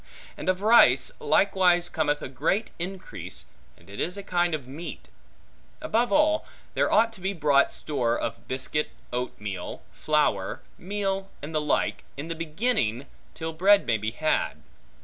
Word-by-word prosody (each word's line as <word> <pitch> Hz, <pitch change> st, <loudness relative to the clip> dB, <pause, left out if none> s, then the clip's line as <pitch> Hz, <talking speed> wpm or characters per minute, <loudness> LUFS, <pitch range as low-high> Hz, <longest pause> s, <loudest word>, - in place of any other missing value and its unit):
And -, -, -3 dB
of 185 Hz, +1 st, 0 dB
rice, 135 Hz, -, +6 dB
likewise 175 Hz, +2 st, +3 dB
cometh 145 Hz, -2 st, 0 dB
a -, -, -3 dB
great 160 Hz, -, -1 dB
increase, 175 Hz, -, -6 dB, 0.3 s
and 85 Hz, -, -21 dB
it 100 Hz, +1 st, -9 dB
is 180 Hz, +3 st, -2 dB
a 200 Hz, -, -6 dB
kind 175 Hz, -3 st, +1 dB
of 140 Hz, -5 st, -8 dB
meat. 135 Hz, -, -8 dB, 0.7 s
Above 235 Hz, +2 st, +1 dB
all, 310 Hz, +1 st, +3 dB, 0.3 s
there -, -, +1 dB
ought 225 Hz, +1 st, +4 dB
to 200 Hz, -, -13 dB
be 190 Hz, +2 st, -1 dB
brought 145 Hz, -5 st, +3 dB
store 120 Hz, -6 st, 0 dB
of -, -, -5 dB
biscuit, 135 Hz, +3 st, -1 dB, 0.2 s
oat 125 Hz, +1 st, -3 dB
meal, 95 Hz, -4 st, -6 dB
flour, 110 Hz, -11 st, 0 dB, 0.2 s
meal, 195 Hz, 0 st, -2 dB
and 155 Hz, +2 st, -6 dB
the 155 Hz, -, +1 dB
like, 150 Hz, -, 0 dB
in 150 Hz, +4 st, -5 dB
the -, -, -1 dB
beginning, 160 Hz, -, -1 dB, 0.3 s
till 160 Hz, 0 st, -4 dB
bread 195 Hz, +5 st, +5 dB
may 115 Hz, -2 st, +1 dB
be 110 Hz, +1 st, -1 dB
had. 155 Hz, +7 st, -1 dB
160 Hz, 160 wpm, -26 LUFS, 130-195 Hz, 0.7 s, rice